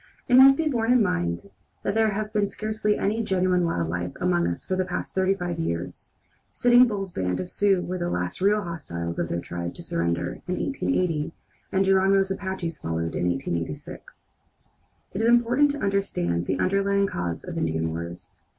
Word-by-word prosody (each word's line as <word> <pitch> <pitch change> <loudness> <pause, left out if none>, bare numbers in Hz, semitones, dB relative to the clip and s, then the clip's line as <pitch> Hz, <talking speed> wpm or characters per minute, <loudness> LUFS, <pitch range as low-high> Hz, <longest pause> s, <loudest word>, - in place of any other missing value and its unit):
It 245 - 0
must 270 +1 +8
be 320 - 0
borne 240 -5 +1
in 250 -3 +5
mind 85 - -2 0.3
that 200 - 0
there 220 0 +3
has 210 +1 -3
been 210 -2 +1
scarcely 215 0 -1
any 215 +3 0
genuine 185 -3 +1
wild 85 - -1
life 90 +2 -3
among 85 -1 +2
us 85 0 -4
for 185 - -1
the 185 - +1
past 180 0 -4
thirty 190 +1 +2
five 175 -3 -4
years. 85 - -4 0.4
Sitting 245 +1 +5
Bull's 195 -4 -3
band 90 - -2
of 90 - -4
Sioux 195 -3 +2
were 180 +1 -4
the 175 0 -1
last 90 - -3
real 205 +2 +3
hostiles 85 - -5
of 85 - -1
their 85 - -1
tribe 85 0 -5
to 175 - -9
surrender, 85 - -2
in 180 - -1
1880, 180 - -1 0.4
and 195 0 +2
Geronimo's 195 0 +3
Apaches 190 -5 -4
followed 80 0 -3
in 90 - 0
1886. 85 -3 -5 0.8
It 195 - -2
is 225 - +2
important 240 +4 +4
to 290 - -5
understand 90 - 0
the 95 - 0
underlying 200 - +2
causes 85 - -3
of - - -7
Indian 80 0 -1
wars. 85 +1 -7
180 Hz, 185 wpm, -25 LUFS, -, 0.8 s, must